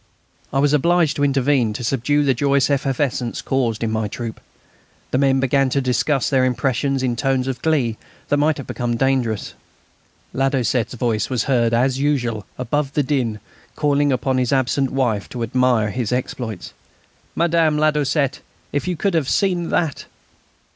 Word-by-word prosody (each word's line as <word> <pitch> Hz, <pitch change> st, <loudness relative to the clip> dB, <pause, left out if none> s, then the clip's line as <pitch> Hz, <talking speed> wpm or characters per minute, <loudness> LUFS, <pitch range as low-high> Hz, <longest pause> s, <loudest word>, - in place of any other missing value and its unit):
I 135 Hz, -, -1 dB
was 145 Hz, +1 st, +3 dB
obliged 170 Hz, +1 st, +3 dB
to 145 Hz, -, 0 dB
intervene 135 Hz, -4 st, +2 dB
to 120 Hz, -, -6 dB
subdue 135 Hz, +4 st, +1 dB
the 135 Hz, -2 st, +3 dB
joyous 140 Hz, +2 st, +2 dB
effervescence 135 Hz, -3 st, -1 dB
caused 120 Hz, -5 st, -1 dB
in 110 Hz, -, -1 dB
my 110 Hz, -1 st, -1 dB
troop. 115 Hz, +2 st, -6 dB, 0.7 s
The 130 Hz, -, +1 dB
men 135 Hz, -1 st, +3 dB
began 135 Hz, 0 st, +2 dB
to 140 Hz, -, +1 dB
discuss 130 Hz, +2 st, +1 dB
their 130 Hz, -2 st, +2 dB
impressions 130 Hz, +1 st, 0 dB
in 125 Hz, -2 st, 0 dB
tones 130 Hz, +1 st, 0 dB
of 130 Hz, -2 st, -3 dB
glee 135 Hz, -9 st, +1 dB, 0.3 s
that 145 Hz, -, +2 dB
might 150 Hz, +1 st, +2 dB
have 140 Hz, -, -6 dB
become 120 Hz, -2 st, -2 dB
dangerous. 125 Hz, -5 st, 0 dB, 0.8 s
Ladoucette's 130 Hz, -3 st, 0 dB
voice 115 Hz, -4 st, -1 dB
was 125 Hz, -3 st, 0 dB
heard, 120 Hz, -4 st, +2 dB
as 130 Hz, +3 st, +1 dB
usual, 120 Hz, -8 st, -1 dB
above 135 Hz, +3 st, -2 dB
the 145 Hz, -, +1 dB
din, 125 Hz, -6 st, -1 dB, 0.4 s
calling 145 Hz, -1 st, +2 dB
upon 130 Hz, 0 st, 0 dB
his 125 Hz, -2 st, 0 dB
absent 135 Hz, 0 st, +1 dB
wife 120 Hz, -7 st, -1 dB
to 120 Hz, -2 st, -4 dB
admire 120 Hz, -2 st, +1 dB
his 120 Hz, -3 st, -2 dB
exploits: 120 Hz, -5 st, -4 dB, 0.6 s
"Madame 165 Hz, -2 st, +2 dB
Ladoucette, 150 Hz, -2 st, +1 dB, 0.3 s
if 145 Hz, +4 st, -2 dB
you 180 Hz, -, 0 dB
could 195 Hz, +4 st, 0 dB
have 160 Hz, -5 st, +1 dB
seen 180 Hz, -4 st, +1 dB
that!" 160 Hz, -6 st, -1 dB
135 Hz, 160 wpm, -20 LUFS, 120-145 Hz, 0.8 s, was